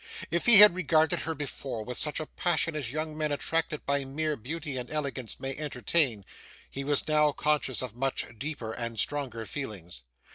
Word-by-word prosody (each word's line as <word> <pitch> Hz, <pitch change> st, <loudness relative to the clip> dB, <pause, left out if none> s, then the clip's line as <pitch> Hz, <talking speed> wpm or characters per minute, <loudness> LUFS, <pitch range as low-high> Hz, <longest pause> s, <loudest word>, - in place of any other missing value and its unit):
If 170 Hz, +5 st, -1 dB
he 235 Hz, -3 st, +9 dB
had 210 Hz, -2 st, +10 dB
regarded 160 Hz, -3 st, +2 dB
her 160 Hz, 0 st, -3 dB
before, 135 Hz, -5 st, -5 dB
with 125 Hz, -, -5 dB
such 150 Hz, +3 st, +2 dB
a 155 Hz, -, -3 dB
passion 165 Hz, -1 st, 0 dB
as 140 Hz, -6 st, -3 dB
young 155 Hz, +3 st, -4 dB
men 155 Hz, -1 st, -1 dB
attracted 160 Hz, +1 st, -1 dB
by 140 Hz, 0 st, +1 dB
mere 150 Hz, +3 st, -2 dB
beauty 145 Hz, +4 st, -5 dB
and 125 Hz, -1 st, -5 dB
elegance 140 Hz, -6 st, -4 dB
may 135 Hz, 0 st, -4 dB
entertain, 130 Hz, -, 0 dB, 0.5 s
he 135 Hz, -, -5 dB
was 145 Hz, +1 st, +1 dB
now 150 Hz, -1 st, +3 dB
conscious 150 Hz, -4 st, 0 dB
of 125 Hz, -4 st, -6 dB
much 135 Hz, +2 st, -1 dB
deeper 140 Hz, -6 st, -4 dB
and 115 Hz, -2 st, -4 dB
stronger 130 Hz, -5 st, -2 dB
feelings. 100 Hz, -, -7 dB
145 Hz, 180 wpm, -29 LUFS, 125-155 Hz, 0.5 s, had